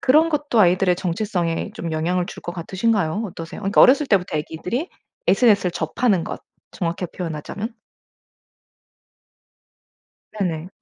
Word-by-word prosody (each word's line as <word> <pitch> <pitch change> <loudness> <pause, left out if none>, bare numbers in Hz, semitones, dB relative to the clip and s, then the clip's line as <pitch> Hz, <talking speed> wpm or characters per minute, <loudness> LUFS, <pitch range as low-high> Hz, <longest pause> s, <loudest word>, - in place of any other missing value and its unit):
그런 310 +5 +5
것도 290 -7 +1
아이들의 180 0 +4
정체성에 175 -2 -2
좀 165 - -4
영향을 175 +3 0
줄 - - -9
것 175 - -5
같으신가요? 190 +2 0
어떠세요? 165 0 -8
그러니까 195 +1 +3
어렸을 280 +2 +6
때부터 180 -7 +1
아기들이 180 - -3 0.4
SNS를 205 - +4
접하는 180 +3 +1
것, - - -6 0.3
정확히 170 -1 -3
표현하자면. 180 +7 -5 2.6
네네. 175 -5 -2
185 Hz, 325 characters per minute, -22 LUFS, 165-220 Hz, 2.6 s, 어렸을